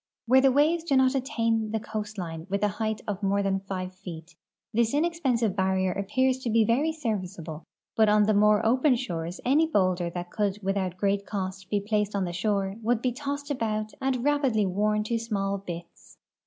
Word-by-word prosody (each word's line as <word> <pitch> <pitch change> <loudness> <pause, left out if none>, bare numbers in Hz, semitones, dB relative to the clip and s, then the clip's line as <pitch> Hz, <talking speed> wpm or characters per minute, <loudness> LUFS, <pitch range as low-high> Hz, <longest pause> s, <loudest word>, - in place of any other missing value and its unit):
Where 260 +3 +5
the 270 0 +5
waves 310 +5 +3
do 290 -5 +1
not 260 0 +4
attain 230 -5 0
the 220 +1 -1
coastline 210 -7 -5
witli 200 +1 -2
a - - +5
height 220 +1 -3
of 205 -1 -3
more 200 0 +1
than 195 -1 +1
five 185 -1 -5
feet, 180 -3 -10 0.4
this 230 +3 +2
ine.xpensive 275 - +1
barrier 190 -1 +1
appears 255 +7 0
to 255 - -3
l;e 225 0 +4
very 275 +9 +2
serviccalde, 185 - -4 0.4
l)ut 220 -1 +6
on 210 0 +5
tlie 215 0 +2
more 210 +1 +4
open 255 +4 +4
shores 175 -8 -4
any 295 +6 +4
boulder 185 - +1
that 175 0 -6
could 205 -2 0
without 190 -2 -1
great 200 +1 0
cost 190 -2 -4
he 205 - +1
placed 210 0 -1
on 195 -2 0
the 175 - -4
shore 195 +1 -1
would 235 +1 0
be 255 - +2
tossed 285 +2 -4
about 215 -4 -2
and 265 -1 +1
rapidl}" 270 -8 +2
worn 210 +2 +1
to 230 +2 -1
small 200 -3 -2
bits. 175 -3 -9
210 Hz, 190 wpm, -27 LUFS, 190-245 Hz, 0.4 s, l)ut